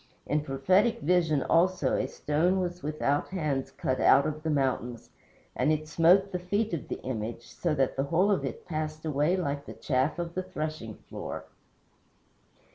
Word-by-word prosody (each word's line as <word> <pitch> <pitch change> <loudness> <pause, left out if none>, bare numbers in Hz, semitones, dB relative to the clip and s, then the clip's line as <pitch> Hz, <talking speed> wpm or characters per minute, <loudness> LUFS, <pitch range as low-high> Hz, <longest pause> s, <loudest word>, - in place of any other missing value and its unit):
In 150 +1 +1
prophetic 180 - +2
vision, 160 -3 +2
also, 170 -5 +2
a 130 - 0
stone 160 +7 +1
was 175 -1 -3
without 145 -1 0
hands 150 -8 -2
cut 130 0 -2
out 140 - +6
of 155 0 -3
the 160 - -2
mountains, 130 -5 -1 0.4
and 155 - +2
it 155 0 -1
smote 180 +5 +4
the 180 - -2
feet 205 +4 -1
of 160 - -3
the - - -4
image, 115 -1 -5
so 165 -4 -1
that 135 -2 +1
the 135 - +1
whole 180 +7 +2
of 195 - +1
it - - -5
passed 155 -1 -4
away 150 +4 +1
like 140 -5 -3
the - - -7
chaff 130 +3 0
of 170 -1 -4
the 185 - -1
threshing 155 - -5
floor. - - -6
155 Hz, 175 wpm, -28 LUFS, 140-180 Hz, 0.4 s, out